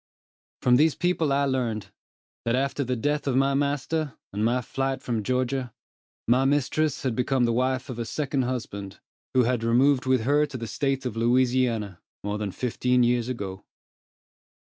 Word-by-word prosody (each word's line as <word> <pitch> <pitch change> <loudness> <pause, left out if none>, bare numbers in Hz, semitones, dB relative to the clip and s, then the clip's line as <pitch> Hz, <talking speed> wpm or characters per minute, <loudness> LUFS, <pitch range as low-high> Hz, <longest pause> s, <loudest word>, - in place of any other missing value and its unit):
From 125 0 +5
these 155 +2 +4
people 175 -4 +1
I 140 +1 +2
learned, 120 -6 -2 0.5
that 115 +1 +1
after 140 +2 0
the 125 0 -1
death 145 +5 -1
of 130 - +1
my 135 +1 +3
master, 145 +1 -1 0.2
and 105 +2 -1
my 120 +3 +2
flight 135 +2 -2
from 115 -3 -1
Georgia, 125 +1 -1 0.5
my 125 +3 +4
mistress 145 +2 +1
had 130 -4 0
become 125 +1 +1
the 115 - +1
wife 130 +2 0
of 125 -4 -6
a 115 - -2
second 140 +1 -1
husband, 100 -6 -5 0.4
who 130 - +5
had 120 -1 0
removed 130 +3 +3
with 130 -2 +3
her 145 +5 +2
to 140 -3 -6
the 115 - -5
State 135 +3 -1
of 120 -4 -3
Louisiana 120 -4 +1 0.2
more 105 +1 -2
than 105 -2 -2
fifteen 125 +2 +1
years 120 0 +1
ago. 100 -6 -5
125 Hz, 170 wpm, -26 LUFS, 115-135 Hz, 0.5 s, From